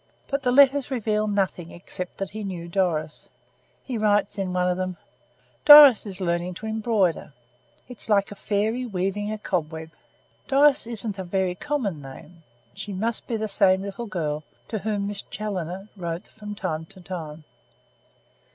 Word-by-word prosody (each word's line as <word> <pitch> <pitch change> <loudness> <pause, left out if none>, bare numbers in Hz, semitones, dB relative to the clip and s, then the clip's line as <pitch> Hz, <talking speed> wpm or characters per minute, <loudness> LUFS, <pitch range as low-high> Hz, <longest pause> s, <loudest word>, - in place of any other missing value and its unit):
But 275 0 -1
the 250 - +1
letters 280 +1 +5
reveal 215 -4 0
nothing 190 -4 -1
except 180 +1 -8
that 195 -1 -4
he 215 +1 -6
knew 180 -4 -5
Doris. 170 -4 -1 0.5
He 245 -4 -4
writes 205 -1 +1
in 190 -2 -2
one 180 0 +1
of 180 - +1
them: 185 -1 -3 0.7
'Doris 290 -7 +10
is 190 -1 -6
learning 175 0 -1
to 220 - -8
embroider. 220 - 0 0.5
It's 245 -3 -7
like 200 -1 +3
a - - -4
fairy 215 +4 -1
weaving 205 -1 -2
a 215 - -3
cobweb!' 160 -5 -3 0.6
Doris 280 -3 +4
isn't 220 -3 -3
a - - -2
very 185 0 0
common 205 - -3
name. 140 +5 -12 0.3
She 205 - -6
must 220 +4 -2
be 230 - -1
the 220 0 -2
same 190 -2 +3
little 200 +4 -6
girl 155 -6 -3 0.3
to 220 - -2
whom 205 0 -2
Miss 200 0 -4
Challoner 195 -2 -5
wrote 170 0 -5
from 210 -1 -9
time 160 -4 -3
to 190 - -15
time." 165 -4 -7
200 Hz, 160 wpm, -25 LUFS, 180-220 Hz, 0.7 s, Doris